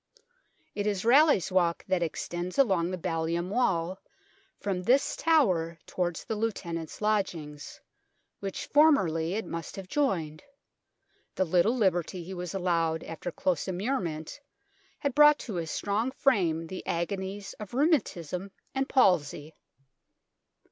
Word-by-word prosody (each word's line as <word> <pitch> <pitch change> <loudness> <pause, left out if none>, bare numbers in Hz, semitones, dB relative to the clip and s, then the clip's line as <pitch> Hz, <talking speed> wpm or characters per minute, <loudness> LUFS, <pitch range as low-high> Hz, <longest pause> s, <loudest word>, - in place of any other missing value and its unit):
It 205 0 -2
is 200 -1 -1
Raleigh's 270 - +5
Walk 175 -2 +1
that 185 -2 0
extends 175 +2 -3
along 190 -11 +3
the 185 - -3
ballium 170 0 -2
wall 190 -6 0 0.6
from 195 -3 -2
this 250 +9 +2
tower 185 - +2
towards 175 -2 -2
the - - -3
Lieutenant's 180 -8 -4
Lodgings, 170 -9 -2 0.6
which 195 -1 -5
formerly 190 - +3
it 220 - -2
must 165 0 -6
have 195 -2 -8
joined 175 - -1 0.9
the 190 - +1
little 180 +8 +2
liberty 180 -4 0
he 185 +3 -7
was 180 +1 -5
allowed 165 -3 0
after 165 +2 -6
close 175 +1 -1
immurement 185 - -3 0.6
had 280 -2 -2
brought 295 +1 +7
to 220 - -7
his 170 -3 -3
strong 210 +5 -1
frame 185 - +1
the 185 +3 -7
agonies 190 +3 -3
of 210 +2 -8
rheumatism 200 - 0 0.2
and 270 +1 -1
palsy. 160 - +2
185 Hz, 125 wpm, -28 LUFS, 170-215 Hz, 0.9 s, brought